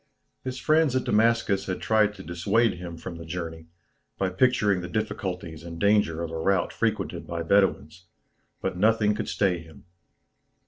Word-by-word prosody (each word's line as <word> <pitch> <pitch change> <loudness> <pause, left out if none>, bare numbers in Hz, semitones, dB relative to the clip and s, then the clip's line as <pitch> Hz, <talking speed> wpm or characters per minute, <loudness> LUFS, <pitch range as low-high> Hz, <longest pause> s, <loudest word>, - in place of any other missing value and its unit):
His 130 0 -4
friends 155 -2 +3
at 130 - +1
Damascus 110 -2 +2
had 95 - -2
tried 105 -1 +2
to - - -10
dissuade 90 +5 +1
him 85 -2 -7
from 85 +1 -7
the 85 - -8
journey, 80 -1 -6 0.5
by 95 - 0
picturing 100 -2 +2
the 90 - -5
difficulties 90 -7 -3
and 85 0 -8
danger 100 -5 +2
of 85 - -4
a 80 - -4
route 95 +1 +1
frequented - - -2
by 85 -1 -3
Bedouins; 90 -2 +1 0.5
but - - -2
nothing 105 +2 +3
could 110 - -4
stay 95 -4 +1
him. 80 -3 -14
95 Hz, 165 wpm, -26 LUFS, 85-110 Hz, 0.5 s, friends